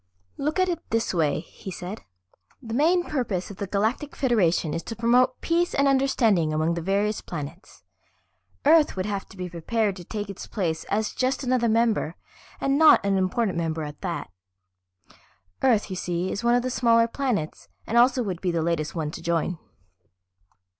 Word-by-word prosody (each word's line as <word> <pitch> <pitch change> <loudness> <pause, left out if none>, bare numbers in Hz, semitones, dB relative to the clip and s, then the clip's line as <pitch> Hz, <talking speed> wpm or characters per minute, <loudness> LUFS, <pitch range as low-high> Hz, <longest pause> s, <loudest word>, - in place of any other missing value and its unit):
"Look 300 +5 -1
at 370 - +3
it 345 -3 -1
this 225 -1 0
way," 155 -4 +1
he 185 - -11
said. 185 +3 -6 0.6
"The 225 -3 -7
main 335 +7 +3
purpose 225 - -2
of 195 - -11
the 200 - -4
Galactic 220 +9 -1
Federation 180 - +1
is 165 - -2
to 225 - -5
promote 245 +3 +3
peace 340 +1 +1
and 280 0 +3
understanding 240 - +2
among 155 +2 +1
the 170 - -3
various 200 +4 0
planets. 165 +3 -8 0.8
Earth 315 0 +5
would 185 0 -2
have 200 -2 -3
to 195 - -14
be 180 0 -4
prepared 195 +5 -1
to 175 - -9
take 205 +3 -5
its 200 -1 -8
place 170 -6 -2
as 215 +1 -1
just 260 +2 -1
another 250 -2 +1
member, 220 -7 +1 0.4
and 275 +1 +1
not 315 -9 +7
an 200 -1 +2
important 185 -1 0
member 160 -1 -2
at 150 0 -8
that. 170 - -4 1.3
Earth, 225 -6 +2
you - - -3
see, 180 0 -2
is 200 - -4
one 240 0 +4
of 245 - +1
the 255 - -2
smaller 230 -2 +4
planets 230 - -3 0.2
and 225 - -3
also 250 +1 +5
would 185 -5 -4
be 185 - 0
the 170 -2 0
latest 160 -2 -1
one 155 -3 -2
to - - -8
join. 170 0 -1
210 Hz, 180 wpm, -25 LUFS, 175-250 Hz, 1.3 s, not